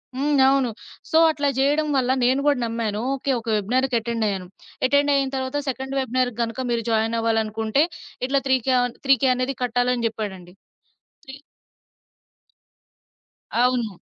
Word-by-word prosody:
హ్మ్. 290 +2 0
అవును. 270 -2 +3 0.4
సో 320 - +4
అట్లా 290 -2 -1
జేయడం 290 +3 +2
వల్ల 255 -1 +2
నేను 255 +2 +3
గూడా 290 -3 +3
నమ్మాను 225 -2 -2
ఓకే. 275 +1 -2
ఒక 230 - -14
వెబినార్‌కి 250 +5 0
అటెండ్ 230 0 -2
అయ్యాను. 190 -3 -3 0.4
అటెండ్ 285 +1 +3
అయిన 275 -1 +1
తరువాత 260 +2 -2
"సెకండ్ 265 +1 -4
వెబినార్‌కి 255 -2 -1
గనక 230 +2 -5
మీరు 230 -1 0
జాయినవ్వాలనుకుంటే 225 +2 +1 0.4
ఇట్లా 275 +1 +1
3 260 0 +4
కే 260 - +3
అన్ 245 -1 -3
3 270 0 +6
కే 265 - +4
అనేది 255 +2 -2
కట్టాలి" 245 +1 +1
అని 235 -1 -2
జేప్పాడండి. 195 -5 -6 0.7
3 270 -1 -9 2.2
అవును. 240 -5 0
250 Hz, 145 wpm, -23 LUFS, 225-270 Hz, 2.2 s, 3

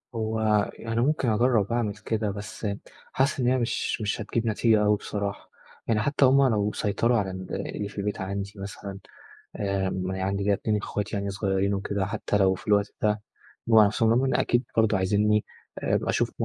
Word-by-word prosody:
هو 110 0 -1 0.3
يعنى 115 +1 -2
ممكن 135 -2 +1
أجرِّب 110 -2 +2
أعمل 110 -4 0
كده، 110 -2 -2
بس 105 +1 -6 0.5
حاسس 135 +1 +1
إن 125 - +1
هي 130 - +3
مش 120 -2 -1
مش 105 +1 -1
هتجيب 115 +2 -2
نتيجة 110 0 +3
أوي 105 0 +4
بصراحة، 100 0 -5 0.4
يعني 110 -2 +2
حتى 140 +4 +2
هم 135 +1 +5
لو 105 -1 +1
سيطروا 115 +3 +1
على 95 -2 -1
ال 95 0 -5
اللي 105 - -3
في 100 - -15
البيت 100 0 -2
عندي 100 +1 -4
مثلًا، 100 0 -7 0.6
آآ، 100 -2 -1
م 95 0 -3
عندي 95 +1 -2
كده 100 0 +3
2 105 +2 0
إخواتي 105 +1 -3
يعني 100 0 -2
صغيرين 100 0 0
وكده، 100 0 -1
حتى 105 0 -1
لو 95 -1 +4
في - - -13
الوقت 105 -1 +2
ده 105 0 +1 0.5
جم 115 - +4
على 105 -2 +8
نفسهم، 110 +2 +1
رغم 125 +3 +3
إن 130 - +1
أكيد 120 +1 +2
برضه 110 -2 +4
عايزينني 105 +3 +2 0.3
أبقى - - 0
أشوف - - +1
105 Hz, 190 wpm, -26 LUFS, 100-115 Hz, 0.6 s, على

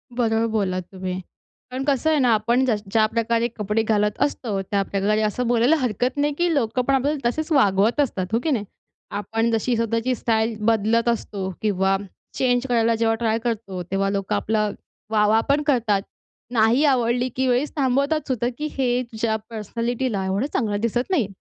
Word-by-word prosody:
बरोबर 225 -2 +1
बोललात 190 -4 0
तुम्ही. 185 -1 -4 0.5
पण 260 +1 -3
कसं 280 +2 +2
आहे 310 -2 +3
ना, 250 -3 +4
आपण 235 +4 +2
ज 255 - +1 0.2
ज्या 220 0 +4
प्रकारे 230 0 +1
कपडे 210 +1 0
घालत 210 -1 +1
असतो, 225 -8 -1
त्याप्रकारे 200 +1 0
असं 215 +3 -1
बोलायला 240 +5 +4
हरकत 250 0 -1
नाही, 290 +1 +1
की 345 -1 +1
लोकं 250 -3 +1
पण 275 - +3
आपल्याला 275 -1 0
तसेचं 315 +4 -2
वागवत 210 0 +3
असतात. 200 -9 -1
हो 230 - +3
की 320 - 0
नाही? 220 -7 0 0.5
आपण 225 +2 -1
जशी 230 +2 +1
स्वतःची 230 +2 0
स्टाईल 225 -1 0
बदलत 225 +1 +2
असतो 200 -4 -2
किंवा 195 -2 +1 0.4
चेंज 245 -1 +2
करायला 230 -2 +2
जेव्हा 225 0 +1
ट्राय 225 -1 0
करतो. 215 -6 -3
तेव्हा 195 0 +1
लोकं 195 -1 -1
आपला 215 -1 0 0.4
वाह-वाह 215 0 +3
पण 285 +1 +3
करतात. 230 -8 +2 0.5
नाही 230 +4 +4
आवडली, 245 -2 +2
की 260 0 0
वेळेस 255 +4 +1
थांबवतात 280 +2 +1
सुद्धा, 245 -3 0
की 300 - -3
हे 250 -2 +1
तुझ्या 220 0 -1
पर्सनॅलिटीला 230 0 -2
एवढं 195 +6 0
चांगलं 210 -4 0
दिसत 240 - -1
नाही. 275 - +2
230 Hz, 170 wpm, -23 LUFS, 210-255 Hz, 0.5 s, ना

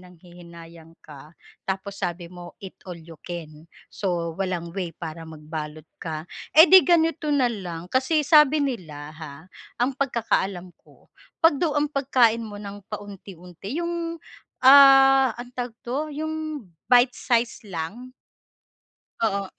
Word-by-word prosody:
nanghihinayang 170 -2 -15
ka, 150 0 -14 0.4
tapos 195 +1 -4
sabi 175 -1 -4
mo 175 -1 -11
eat-all-you-can, 165 -3 -10 0.3
so 175 -4 -3
walang 180 -3 -3
way 180 -3 -3
para 165 -1 -8
magbalot 155 0 -8
ka, 155 -2 -6 0.3
edi 350 +4 +8
ganito 330 -2 +2
na 260 -3 +3
lang, 175 -5 -7
kasi 265 +5 +1
sabi 300 -2 +6
nila 160 - -5
ha, 155 -3 -9 0.5
ang 255 +3 +1
pagkakaalam 200 -8 -1
ko, - - -24 0.3
'pag 325 -3 +5
daw 315 -2 0
ang 295 - 0
pagkain 250 -5 +2
mo 210 -2 -8
ng 200 -1 -9
paunti-unti, 195 - -8
yung 340 -1 -3 0.5
ah, 270 -2 +7
anong 245 +1 -9
tawag 245 -2 -4
dito, 245 +2 -4 0.3
yung 315 0 -3 0.5
bite-size 245 -2 +2
lang. 195 +9 -6 1.1
Oo, 200 -3 -1
200 Hz, 120 wpm, -24 LUFS, 170-260 Hz, 1.1 s, edi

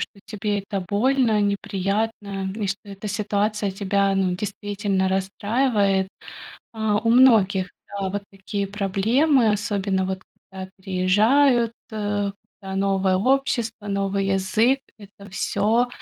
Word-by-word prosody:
что 200 - -6
тебе 210 -1 -2
это 200 0 -4
больно, 230 0 +2
неприятно, 200 0 -2
и 210 -3 -2
что 195 +1 -3
эта 200 +1 -8
ситуация 210 0 -1
тебя, 195 0 +1
ну, 185 -2 +1
действительно 200 -1 -2
расстраивает. 200 +1 +1 0.6
А, 220 -2 0
у 230 +1 +1
многих, 210 -7 +5 0.2
да, 200 -1 -3
вот 200 +2 -3
такие 195 +1 -4
проблемы, 220 +7 +2
особенно 200 -2 -1
вот 190 -1 -4 0.3
когда 190 -1 -8
переезжают: 220 +7 +3 0.2
когда 205 -2 -2 0.4
новое 195 -1 +1
общество, 235 -3 0
новый 195 -1 -1
язык- 195 +7 +2 0.2
это 200 -1 -14
всё 220 +6 +1
200 Hz, 115 wpm, -23 LUFS, 195-220 Hz, 0.6 s, многих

